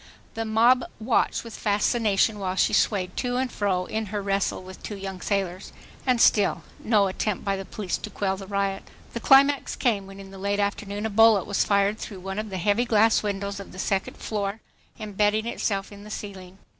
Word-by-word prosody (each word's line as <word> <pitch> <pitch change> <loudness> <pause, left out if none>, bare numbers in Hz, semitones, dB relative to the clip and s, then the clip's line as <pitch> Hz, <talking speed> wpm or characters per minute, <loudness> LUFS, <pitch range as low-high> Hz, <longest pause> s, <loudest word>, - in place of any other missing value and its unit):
The 225 0 -3
mob 235 +3 +4 0.2
watched 225 +2 +1
with 230 -1 -9
fascination 210 0 +1
while 185 -1 -2
she - - +2
swayed 185 -4 +1
to 245 -1 -1
and 260 -1 -1
fro 185 -3 0
in 220 +2 -3
her 205 +1 -3
wrestle 195 -1 -1
with 185 0 -11
two 210 - -6
young 190 -2 -6
sailors. 195 -2 -2 0.4
And 250 -2 +3
still 205 -3 +4 0.2
no 215 -3 +3
attempt 195 +1 -2
by 195 -1 +1
the 195 0 -6
police 190 0 -3
to 215 - -6
quell 195 -1 -1
the 195 0 -9
riot! 200 -1 -1 0.3
The 235 - -3
climax 275 +3 +4
came 205 -6 0
when 195 0 -11
in 195 -1 -11
the 195 - -10
late 200 +1 -1
afternoon 205 +1 -2
a - - 0
bullet 220 -3 +5
was 200 - +1
fired 200 +1 +2
through 195 -4 -7
one 195 +2 -4
of 215 0 -4
the 190 - -4
heavy 205 +6 +2
glass 225 -1 +4
windows 200 -1 -3
of 200 - -10
the - - -11
second 190 +1 -1
floor, 205 0 -3 0.4
embedding 210 +1 0
itself 200 -4 -2
in 200 0 -11
the 210 - -11
ceiling. 190 -3 -8
200 Hz, 205 wpm, -25 LUFS, 195-220 Hz, 0.4 s, bullet